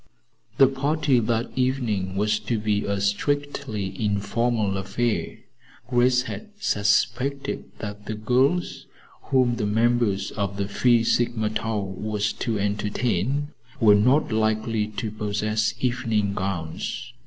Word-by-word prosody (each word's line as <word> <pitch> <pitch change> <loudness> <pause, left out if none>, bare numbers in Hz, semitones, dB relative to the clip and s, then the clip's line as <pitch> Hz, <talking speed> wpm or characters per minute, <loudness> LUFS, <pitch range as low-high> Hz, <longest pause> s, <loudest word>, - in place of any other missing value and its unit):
The 135 - +8
party 140 0 +1
that 115 +1 -1
evening 120 -8 0
was 105 +1 +1
to 115 - -2
be 105 -1 0
a 100 -1 -1
strictly 110 -1 -2
informal 105 +1 0
affair. 115 +4 -2 0.5
Grace 125 +1 +3
had 215 - -7
suspected 115 - 0
that 105 0 -7
the 110 - -3
girls 130 +10 +1 0.4
whom 125 -3 +2
the 105 - -1
members 115 -2 +1
of 100 -2 -3
the 100 -1 -1
Phi 115 +3 +3
Sigma 115 -2 +1
Tau 110 -1 -1
were 105 +2 -3
to 105 +2 -1
entertain 105 +6 -1 0.3
were 110 -4 +7
not 125 +8 +3
likely 110 0 +1
to 105 0 -4
possess 105 +1 -1
evening 115 -5 0
gowns. 95 +6 -4
110 Hz, 120 wpm, -24 LUFS, 105-125 Hz, 0.5 s, The